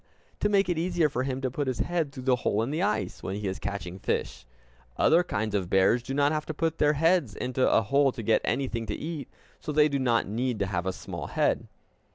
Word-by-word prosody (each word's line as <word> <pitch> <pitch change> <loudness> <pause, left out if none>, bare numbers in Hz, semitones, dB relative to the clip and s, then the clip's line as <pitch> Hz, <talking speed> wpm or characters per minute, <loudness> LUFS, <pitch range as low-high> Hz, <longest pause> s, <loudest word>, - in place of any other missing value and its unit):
To 210 - +1
make 200 -1 +3
it 175 -3 0
easier 175 -2 +1
for 125 - -2
him 130 0 -2
to 130 -1 -1
put 145 +2 -2
his 130 -2 -1
head 170 -5 -1
through 130 -3 -8
the 130 -1 +3
hole 110 -2 0
in 125 - -3
the 155 +3 -1
ice, 205 +2 -1
when 95 - -4
he 105 0 -3
is 95 - -3
catching 95 -2 -5
fish. - - -3 0.5
Other 165 +2 +5
kinds 110 -9 -2
of 95 -4 -1
bears 95 +6 +4
do 135 +3 -5
not 145 +1 +3
have 155 -1 -2
to 155 - -4
put 165 +1 -1
their 150 0 +4
heads 160 - +2
into 130 0 0
a 115 - +4
hole 140 +5 +3
to 115 - -6
get 110 +1 +3
anything 120 -3 -1
to 105 - -2
eat; 155 -5 -5 0.3
so 155 - -5
they 150 0 +5
do 140 -1 -1
not 120 -5 +2
need 120 +3 -1
to 100 - 0
have 90 -2 -2
a - - +1
small - - -7
head. - - 0
130 Hz, 245 wpm, -27 LUFS, 110-155 Hz, 0.5 s, Other